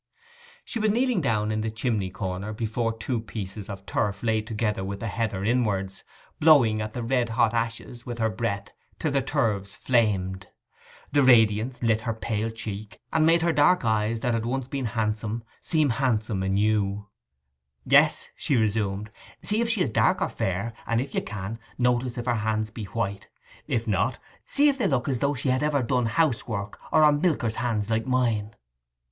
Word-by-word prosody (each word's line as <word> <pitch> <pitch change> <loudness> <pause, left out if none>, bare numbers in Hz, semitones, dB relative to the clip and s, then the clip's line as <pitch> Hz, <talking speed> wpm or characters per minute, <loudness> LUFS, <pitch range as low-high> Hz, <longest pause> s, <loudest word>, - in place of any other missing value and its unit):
She 235 - -4
was 215 0 +2
kneeling 240 -2 +2
down 110 -6 0
in 110 0 -1
the 110 - -1
chimney 110 -3 -1
corner, 95 +2 -4
before 115 +1 -1
two 120 +1 -2
pieces 105 -2 -7
of 100 -1 -7
turf 100 -1 -1
laid 110 -1 0
together 105 -3 -1
with 100 +1 -4
the 115 - -4
heather 100 -3 -2
inwards, 105 -5 0 0.4
blowing 130 -9 +5
at 110 0 -4
the 120 - -4
red 120 0 +1
hot 115 -1 +2
ashes 115 +1 -3
with 120 -1 -6
her 110 -1 +1
breath 105 -3 -3 0.3
till 155 - -1
the 140 -1 +2
turves 110 -8 -1
flamed. 95 -6 +1 0.6
The 145 - +4
radiance 120 -1 +4
lit 115 -1 +2
her 115 0 -2
pale 110 0 -2
cheek, 105 -3 -6
and 160 0 +4
made 165 0 +4
her 170 -1 +2
dark 150 0 +4
eyes, 110 +1 +1
that 120 0 0
had 115 -1 0
once 125 +2 -2
been 135 -1 -3
handsome, 110 +1 -2 0.2
seem 155 -5 +1
handsome 110 -5 0
anew. 100 +1 +1 0.8
'Yes,' - - +4
she 140 - 0
resumed, 105 -1 0 0.3
'see 210 +2 +1
if 235 - 0
she 225 -4 +1
is - - -2
dark - - +3
or - - 0
fair, 100 +5 -2
and 115 0 +1
if 135 +2 -4
you - - +1
can, 105 +1 -6 0.2
notice 125 0 +1
if 120 - -4
her 120 - +2
hands 110 0 -1
be 110 -2 -6
white; 100 -1 -3 0.4
if 115 0 -1
not, 110 +4 +1 0.3
see 290 +1 +3
if 275 -2 +2
they - - +2
look 130 -4 0
as 130 -4 0
though 140 +2 +1
she 130 +1 -2
had 130 0 +2
ever 150 -3 +1
done 125 0 +1
housework, 110 -7 -1
or 155 -1 +5
are 150 - +7
milker's 145 -8 0
hands 115 -3 -1
like 110 +1 0
mine. 115 -4 0
115 Hz, 185 wpm, -26 LUFS, 105-125 Hz, 0.8 s, are